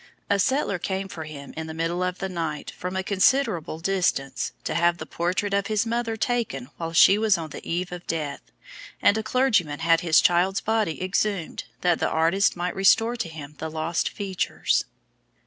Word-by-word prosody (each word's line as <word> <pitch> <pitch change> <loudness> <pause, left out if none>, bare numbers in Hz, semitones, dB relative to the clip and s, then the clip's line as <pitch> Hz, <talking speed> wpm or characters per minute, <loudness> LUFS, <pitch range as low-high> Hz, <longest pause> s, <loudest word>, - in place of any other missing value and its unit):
A 200 - +3
settler 230 -4 +1
came 190 +2 -3
for 165 -4 -7
him 140 -3 -9
in 160 0 -5
the 160 - -7
middle 165 +2 -1
of 180 0 -1
the 190 - -3
night 165 -5 -4
from 180 +1 -6
a 190 - -1
considerable 190 - +2
distance 170 -7 0
to - - -2
have 170 0 +2
the - - -6
portrait 185 +4 -1
of 200 0 +1
his 215 +1 +1
mother 230 -1 -1
taken 210 - -2
while 165 -1 -4
she 190 +5 +6
was 215 -3 +3
on 160 -2 -6
the - - -8
eve 180 +2 -2
of 175 0 -8
death, 150 -4 -3 0.6
and 205 - +4
a 220 - 0
clergyman 215 - +1
had 165 0 +4
his 165 -3 +5
child's 180 +3 +3
body 215 -7 -1
exhumed 185 -2 -1 0.2
that 175 -2 +2
the - - +1
artist 165 +5 +2
might 175 +1 -2
restore 225 +5 +4
to 230 -7 -3
him 150 -2 -9
the 160 - -4
lost 160 +1 -1
features. 195 -3 -1
180 Hz, 190 wpm, -25 LUFS, 165-200 Hz, 0.6 s, she